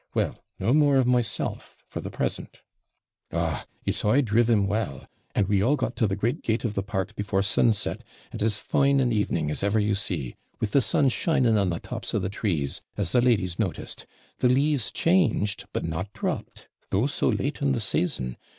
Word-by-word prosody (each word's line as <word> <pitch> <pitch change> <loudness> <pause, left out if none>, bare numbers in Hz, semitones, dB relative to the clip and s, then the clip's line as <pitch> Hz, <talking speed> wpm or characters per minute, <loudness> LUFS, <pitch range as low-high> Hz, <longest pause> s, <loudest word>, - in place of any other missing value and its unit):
Well, - - -1
no 120 - +1
more 145 -2 +5
of 130 - +4
myself, 120 -4 -1
for - - -6
the - - -5
present. - - -4 0.7
Ogh, 80 -2 -2 0.2
it's - - -1
I 115 +7 +4
driv 115 -1 +2
'em 105 -4 +4
well; 100 -9 -2 0.3
and 100 - +2
we 100 -1 +2
all 130 +8 +3
got 130 -3 -2
to 110 - +3
the 95 - -1
great 115 +5 -1
gate 110 0 0
of 110 - -1
the 100 - -1
park 95 +1 -3
before 100 -3 0
sunset, 105 +1 +1 0.3
and - - -6
as 105 -1 +2
fine 140 +3 +2
an 125 -2 +2
evening 85 -8 0
as - - -3
ever 100 +2 +2
you 105 0 +1
see; 85 -10 -2 0.2
with 105 - -1
the 140 - +4
sun 135 +2 +2
shining 125 -4 +2
on 100 -3 +2
the 85 -1 -2
tops - - -5
of 105 - 0
the 95 - -1
trees, 85 -9 -2 0.2
as - - -1
the 125 - +4
ladies 100 -8 +1
noticed; - - -3 0.3
the 125 - +4
leaves 140 0 +2
changed, 145 - +1
but - - -2
not 85 +5 -3
dropped, - - -4 0.2
though 100 +6 +2
so 145 - +1
late 145 +2 -1
in 140 -1 +2
the 120 - 0
season. 75 - -1
105 Hz, 200 wpm, -26 LUFS, 95-125 Hz, 0.7 s, more